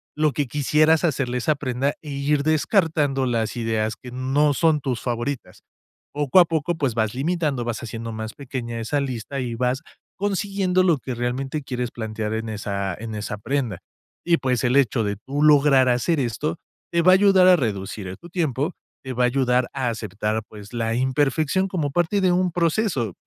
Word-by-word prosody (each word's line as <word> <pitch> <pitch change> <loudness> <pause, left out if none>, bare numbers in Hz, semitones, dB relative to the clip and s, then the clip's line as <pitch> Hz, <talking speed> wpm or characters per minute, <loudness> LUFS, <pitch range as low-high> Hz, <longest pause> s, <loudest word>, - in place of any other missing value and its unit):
lo 150 -1 +2
que 140 +3 -1
quisieras 150 +5 +2
hacerle 135 -6 0
a - - 0
esa 150 +5 +1
prenda 135 0 -1
e 150 - -7
ir 140 +1 0
descartando 155 -4 +2
las 115 -1 -1
ideas 110 -2 -1
que 125 - -10
no 135 +4 +1
son 160 +1 +3
tus 130 -4 -3
favoritas. 120 +2 -4 0.5
Poco 145 +4 +3
a 175 - +8
poco, 165 +1 -1
pues 140 -7 -1
vas 110 0 0
limitando, 150 -2 -1
vas 115 -2 -3
haciendo 115 0 -5
más 110 0 -5
pequeña 125 -4 -5
esa 115 +6 -1
lista 130 0 -4
y 120 -3 -3
vas 125 +4 0 0.4
consiguiendo 195 -2 0
lo 170 -5 +3
que 125 0 -5
realmente 130 +5 -2
quieres 125 -2 -3
plantear 110 -1 -4
en 115 0 -3
esa 100 -3 -3
en 110 -1 -7
esa 105 0 -4
prenda 125 -5 -2 0.5
y, 170 -1 +4
pues, 125 -3 0
el 125 +2 +2
hecho 125 -4 +2
de 100 0 -1
tú 140 +7 -4
lograr 140 -3 +5
hacer 135 +6 +1
esto 150 +7 -2 0.3
te 170 - +2
va 185 +2 +7
a - - +8
ayudar 190 -2 +5
a 185 - +8
reducir 100 -5 -3
tu 175 - -13
tiempo, 160 -2 -1 0.3
te 130 -1 -5
va 125 0 +1
a - - +5
ayudar 125 -1 +1
a 130 -2 -1
aceptar, 110 -1 -2
pues 105 +1 -12
la 115 -1 -1
imperfección 145 +7 +1
como 160 -6 -1
parte 175 +6 +1
de 185 -1 +3
un 180 0 +1
proceso. 165 - 0
135 Hz, 190 wpm, -23 LUFS, 115-155 Hz, 0.5 s, a